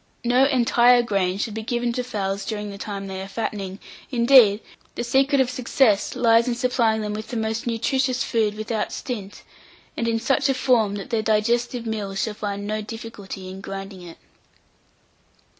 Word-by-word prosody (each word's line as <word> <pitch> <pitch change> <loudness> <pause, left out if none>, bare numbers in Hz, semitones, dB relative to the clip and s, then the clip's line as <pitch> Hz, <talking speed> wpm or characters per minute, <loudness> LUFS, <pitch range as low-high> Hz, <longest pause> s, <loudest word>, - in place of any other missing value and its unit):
No 250 +3 +4
entire 245 -2 +4
grain 195 -4 0
should 215 +1 -3
be 220 - -4
given 240 +1 -1
to 250 +1 -2
fowls 200 -5 -3
during 210 -2 -4
the 200 - -9
time 200 -2 -5
they 190 -1 -5
are 190 - -6
fattening; 195 -2 -4 0.3
indeed, 235 -4 +6 0.4
the 240 - -3
secret 270 +4 +2
of 260 - +4
success 250 -4 +1
lies 230 0 +4
in 240 - 0
supplying 235 -3 +1
them 210 -1 -3
with 215 +1 -5
the 235 +1 -4
most 220 +1 -2
nutritious 255 +2 0
food 215 -2 0
without 215 0 -3
stint, 205 -6 -6 0.5
and 230 - -2
in 230 0 +1
such 265 +3 +1
a 270 - +2
form 235 -6 +2
that 205 +6 -7
their 225 -2 +1
digestive 235 +3 0
mills 205 -3 -3
shall 220 - -2
find 205 -1 -4
no 215 +1 -2
difficulty 210 -3 -8
in 190 +1 -8
grinding 195 -1 -7
it. 170 -2 -11
220 Hz, 175 wpm, -23 LUFS, 205-245 Hz, 0.5 s, indeed